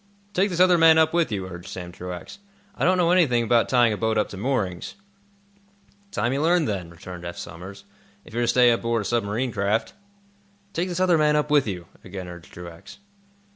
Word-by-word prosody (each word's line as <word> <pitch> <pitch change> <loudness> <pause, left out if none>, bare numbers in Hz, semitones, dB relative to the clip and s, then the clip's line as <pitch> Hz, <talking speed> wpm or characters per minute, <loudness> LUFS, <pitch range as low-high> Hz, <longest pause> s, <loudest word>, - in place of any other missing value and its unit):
"Take 195 +3 +2
this 175 -2 -4
other 180 -1 +5
man 165 -1 +7
up 160 0 +3
with 170 -7 +1
you," 95 -3 -2
urged 90 0 -9
Sam 90 -2 -7
Truax. 90 - -8 0.3
"I - - -4
don't 185 +1 +4
know 175 -1 +3
anything 140 -10 +3
about 115 +1 +2
tying 120 -3 +4
a - - -4
boat 110 0 0
up 105 - +1
to - - -8
moorings." 95 -6 -2 1.1
"Time 120 -9 -1
you 140 - -1
learned, 170 0 +2
then," 95 -5 -3
returned 85 +1 -10
Eph 85 0 -7
Somers, 95 +5 -9 0.4
"if - - -15
you're 120 - -1
to 120 - +1
stay 125 0 +5
aboard 115 -1 0
a - - -10
submarine 115 +3 -1
craft." 105 - -1 0.8
"Take 175 +3 -1
this 175 0 -3
other 180 -3 +3
man 150 0 +3
up 150 0 0
with 145 -5 +4
you," 90 -4 -5 0.2
again 95 -1 -7
urged 85 -2 -11
Truax. 85 - -11
115 Hz, 205 wpm, -24 LUFS, -, 1.1 s, man